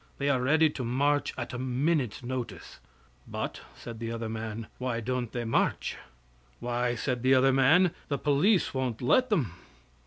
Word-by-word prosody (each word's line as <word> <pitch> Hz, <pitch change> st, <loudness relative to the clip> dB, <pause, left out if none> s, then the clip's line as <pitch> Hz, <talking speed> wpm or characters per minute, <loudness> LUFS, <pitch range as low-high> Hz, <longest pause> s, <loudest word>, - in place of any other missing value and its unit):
They 140 Hz, 0 st, 0 dB
are 130 Hz, -3 st, +2 dB
ready 155 Hz, +5 st, +4 dB
to 135 Hz, -, -5 dB
march 140 Hz, +4 st, +1 dB
at 120 Hz, -1 st, -5 dB
a 125 Hz, -, -4 dB
minute's 130 Hz, -1 st, 0 dB
notice." 120 Hz, -7 st, -5 dB, 0.5 s
"But," -, -, -4 dB
said 115 Hz, -1 st, -9 dB
the 115 Hz, 0 st, -4 dB
other 115 Hz, -1 st, -4 dB
man, 110 Hz, 0 st, -5 dB
"why 125 Hz, -2 st, -1 dB
don't 125 Hz, 0 st, -2 dB
they 120 Hz, -1 st, -3 dB
march?" 115 Hz, -, 0 dB, 0.6 s
"Why," 120 Hz, 0 st, -1 dB
said 125 Hz, +1 st, -2 dB
the 130 Hz, +1 st, +5 dB
other 130 Hz, +1 st, +4 dB
man, 160 Hz, +7 st, +5 dB, 0.2 s
"the 140 Hz, -, -1 dB
police 150 Hz, +9 st, +2 dB
won't 130 Hz, -3 st, -2 dB
let 255 Hz, -, +4 dB
them." 140 Hz, -, +1 dB
125 Hz, 165 wpm, -29 LUFS, 120-140 Hz, 0.6 s, the